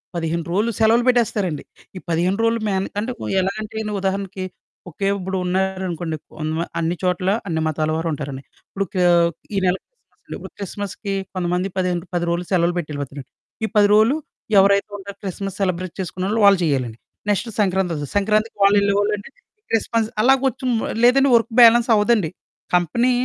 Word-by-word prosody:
15 165 0 -2
రోలు 210 +5 +1
సెలవులు 225 +2 +4
పెట్టేస్తారండి. 210 - +1 0.3
ఈ - - -5
15 175 +4 +1
రోలు 230 0 +2
మేనే 195 -1 -1
అంటే, 225 +4 -2 0.3
ఎలా 190 +1 0
అంటేని 215 0 -4
ఉదాహరణకి, 195 0 -2 0.4
ఓకే. 195 +4 -3
ఇప్పుడు 190 +1 -3
ఉన్నారనుకోండి, 180 -3 -2 0.2
కొన్మా 160 +2 -2
అన్ని 165 +2 0
చోట్లా 180 +1 +1
అన్ని 160 -3 -1
మతాల 155 0 -1
వారు 165 +1 -2
ఉంటారండి. 140 -2 -6 0.2
ఇప్పుడు 195 0 -3
కా 180 -1 +1 0.5
ఈ - - 0
నెల 180 - +3
క్రిస్‌మస్ - - -44
అండి. - - -7
ఇప్పుడు - - -10
క్రిస్‌మస్‌కి 200 +1 -5 0.2
కొంతమంది 180 0 -1
పదిహే 180 -1 +1 0.2
10 175 - 0
రోలు 170 +1 0
సెలవులు 175 -1 +2
పెట్టెళ్ళిపోతారండి. 145 -4 -6 0.4
ఈ - - -1
10 205 -1 +6
రోలు, 220 +7 +5 0.4
ఎవరైతే 200 +1 +4
ఉంటారో 200 0 -9
క్రిస్‌మస్ 195 0 -5
సెలబ్రేట్ 185 -2 -2
చేసుకునేవోళ్ళు 190 +5 -2
వాళ్ళు 195 -2 +6
చెయ్యాలండి. 130 -7 -1 0.3
నెక్స్ట్ 205 +3 0
సంక్రాంతొస్తది, 180 -7 0
సంక్రాంతికి 215 +2 +1
వాళ్ళెళ్ళేవోళ్ళండి, 205 +1 +2 0.4
క్రిస్‌మస్ 225 0 +1
అలాగొచ్చుం 260 0 +2 0.3
లేదంటే 270 +3 +5
వర్కు 230 0 +2
బ్యాలెన్సవ్వదండి. 230 -5 +5 0.5
కంపెనీ 235 +9 +2
190 Hz, 145 wpm, -21 LUFS, 175-215 Hz, 0.5 s, 10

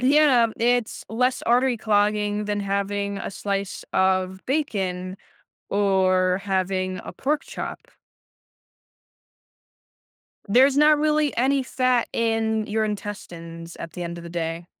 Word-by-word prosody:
Yeah, 265 -3 +5
it's 240 -1 0
less 250 +3 0
artery 245 +1 +3
clogging 210 -1 +1
than 205 0 -1
having 200 0 -2
a - - -5
slice 200 0 -3
of 190 0 +1
bacon 190 -10 -2 0.5
or 185 -2 +2
having 185 -1 -1
a - - -7
pork 295 +2 -1
chop. - - -6 2.7
There's 265 +6 +5
not 300 +1 +6
really 300 -1 +1
any 265 +2 +2
fat 255 -2 +1
in 225 -1 0
your 220 +1 0
intestines 170 -5 -6
at 165 - -8
the 180 - -6
end 170 0 -5
of 170 - -10
the 170 - -8
day. 165 0 -3
205 Hz, 120 wpm, -24 LUFS, 185-245 Hz, 2.7 s, not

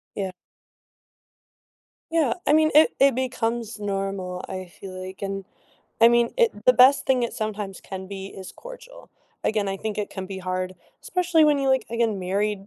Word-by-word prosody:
Yeah. 190 -2 -3 1.8
Yeah, 315 -7 +2
I - - +4
mean, 310 0 +4
it 310 +1 +7
it 275 -1 +5
becomes 240 -3 -2
normal, 195 -3 -3
I 185 0 -5
feel 185 +1 -10
like, 185 +1 -9
and, 195 -1 -3 0.6
I 230 - +9
mean, 235 0 +3
it 470 -2 +4 0.2
the 255 - +8
best 255 +3 +6
thing 255 -2 +3
it 235 - -1
sometimes 210 -3 -4
can 190 -1 -8
be 195 -1 -6
is 190 -1 -9
cordial. - - -12 0.3
Again, 210 -2 +1
I 195 - -2
think 215 +1 -4
it 210 - -3
can 190 -1 -6
be 190 0 -6
hard, 185 0 -3 0.3
especially 345 -3 +2
when 295 -1 +4
you, 270 -1 0
like, 265 -1 +2
again, 230 -3 0
married 195 +2 -1
210 Hz, 175 wpm, -24 LUFS, 195-260 Hz, 1.8 s, I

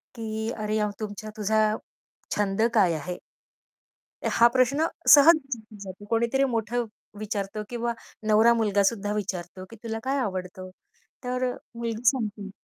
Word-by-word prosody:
की 220 -1 -3
"अरे, 215 0 -1
अ, 210 0 +1
तुमचा 215 0 -6
तुझा 215 +1 +2 0.6
छंद 205 0 0
काय 190 -6 +4
आहे?" 175 +3 -4 1.1
हा 235 - +5
प्रश्न 265 +5 +3 0.3
सहज 310 +3 +9
विचारला 235 -8 -7
जातो. 190 +2 -10
कोणीतरी 235 +4 +2
मोठं 230 +2 -1 0.3
विचारतो 210 -1 -3
किंवा 235 -1 -2 0.3
नवरा 220 +2 +6
मुलगासुद्धा 205 -1 +1
विचारतो, 185 -3 -4
की 230 - -11
"तुला 225 -1 -3
काय 270 +2 0
आवडतं?" 185 -4 -4 0.5
तर 250 +1 -2
अ, - - -7 0.2
मुलगी 230 -1 -4
सांगते, 215 -6 -3
220 Hz, 135 wpm, -26 LUFS, 205-235 Hz, 1.1 s, सहज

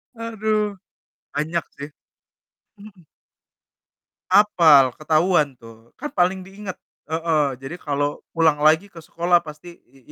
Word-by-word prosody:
Aduh. 215 -2 -2 0.6
Banyak 160 +3 -2
sih. 145 +2 -7 0.9
Mhm. 200 -3 -15 1.3
Hafal, 155 - +5
ketahuan 155 -3 +1
tuh. 115 0 -16
Kan 295 +2 -6
paling 185 +1 0
diingat. 195 -1 -8 0.3
Heeh, 160 -3 +1
jadi 135 +5 -7
kalau 145 0 -2
pulang 160 -3 +2
lagi 160 +6 +4
ke 165 - -12
sekolah 175 +2 +1
pasti, 160 +3 -12
i 135 - -23
165 Hz, 115 wpm, -22 LUFS, 150-190 Hz, 1.3 s, Hafal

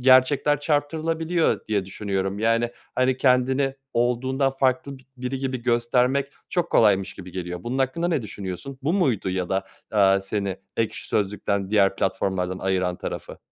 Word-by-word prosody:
gerçekler 135 +3 +5
çarptırabiliyor 160 +3 0
diye 100 -3 +1
düşünüyorum. 95 0 -2
Yani, 115 +2 +2 0.2
hani, 130 0 +2
kendini 130 +1 +2 0.2
olduğundan 130 +3 +1
farklı 135 +1 0
bi - - -20
biri 125 +1 -3
gibi 130 -2 -3
göstermek 125 +3 +2 0.2
çok 175 -2 -1
kolaymış 100 -4 +3
gibi 90 -2 -10
geliyor. 90 -1 -5
Bunun 125 +3 -3
hakkında 135 +6 0
ne 160 -7 0
düşünüyorsun? 100 +5 -6
Bu 150 +4 +1
muydu 130 - +1
ya 90 -1 -2
da, 95 0 0 0.3
eee, 100 -2 +5
seni 95 -1 -2 0.2
Ekşi 110 -1 -2
Sözlük'ten, 100 -1 -1
diğer 100 -2 +4
platformlardan 95 -3 -1
ayıran 95 -2 0
tarafı? - - -6
120 Hz, 145 wpm, -24 LUFS, 95-135 Hz, 0.3 s, gerçekler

